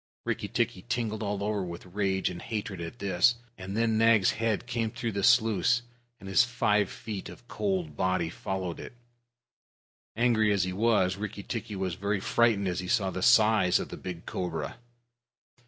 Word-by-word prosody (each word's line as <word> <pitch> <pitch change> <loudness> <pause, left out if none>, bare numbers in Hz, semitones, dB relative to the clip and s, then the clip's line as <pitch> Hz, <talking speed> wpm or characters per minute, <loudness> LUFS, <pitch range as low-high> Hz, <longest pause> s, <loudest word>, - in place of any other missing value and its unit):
Rikki - - -2
tikki 120 -1 -1
tingled 115 -3 -1
all 100 -1 -2
over 105 -1 -1
with 85 0 -7
rage 95 0 -1
and 85 -1 -7
hatred 105 -4 -4
at 85 0 -6
this, 100 +4 +3 0.2
and 95 +1 -6
then 115 -1 +2
Nag's 115 -4 +5
head 115 -1 -1
came 115 -2 -1
through 115 +1 -4
the 100 -1 -2
sluice, 115 0 +4 0.4
and 95 - -11
his 95 +5 +5
five 105 -5 +1
feet 105 -4 -6
of 120 - -13
cold 190 -4 -2
body 95 -2 0
followed 95 -4 -4
it. - - -9 1.2
Angry 110 -2 +3
as 100 -3 +2
he 90 0 -2
was, 100 -3 +2
Rikki 105 0 -5
tikki 115 -1 -5
was 95 -2 -2
very 100 +3 -1
frightened 110 -1 +2
as 90 0 -1
he 90 - -5
saw 95 -1 +1
the 95 - -4
size 105 -3 +5
of - - -5
the - - -6
big 90 -2 -7
cobra. 85 -4 -4
105 Hz, 175 wpm, -28 LUFS, 95-115 Hz, 1.2 s, Nag's